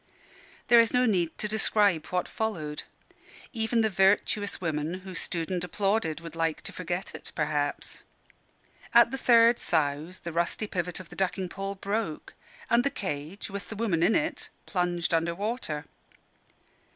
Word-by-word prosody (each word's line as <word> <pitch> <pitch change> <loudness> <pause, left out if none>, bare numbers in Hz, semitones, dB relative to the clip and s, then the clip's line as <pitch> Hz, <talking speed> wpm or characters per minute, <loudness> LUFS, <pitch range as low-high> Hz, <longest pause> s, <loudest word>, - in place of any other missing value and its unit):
There 240 -1 +8
is 230 +1 +4
no 250 0 +4
heed 180 -7 +1
to 210 - -1
describe 205 -6 +2
what 180 -1 -1
followed. 155 -10 -3 0.7
Even 225 0 +1
the 220 - +2
virtuous 200 +2 +2
women 160 -1 -2
who 190 - -7
stood 165 0 -3
and 180 -1 -1
applauded 195 -2 0
would 165 0 -9
like 165 -1 -1
to - - -4
forget 180 +1 -4
it, 160 - -9
perhaps. 150 -1 -2 0.9
At 235 0 +7
the 270 - -2
third 235 -1 +6
souse, 155 +2 0
the 170 - -7
rusty 170 +5 0
pivot 180 -2 -3
of 185 - -10
the - - -11
ducking 190 -1 -1
pole 195 +2 -4
broke, 200 -4 -3 0.3
and 235 +1 +4
the 280 - +2
cage, 185 - -5
with 200 0 -6
the 220 - -6
woman 200 -7 0
in 185 +6 +4
it, 305 +2 -1 0.2
plunged 175 -2 -1
under 165 +1 +1
water. 200 -7 -3
185 Hz, 160 wpm, -28 LUFS, 165-220 Hz, 0.9 s, There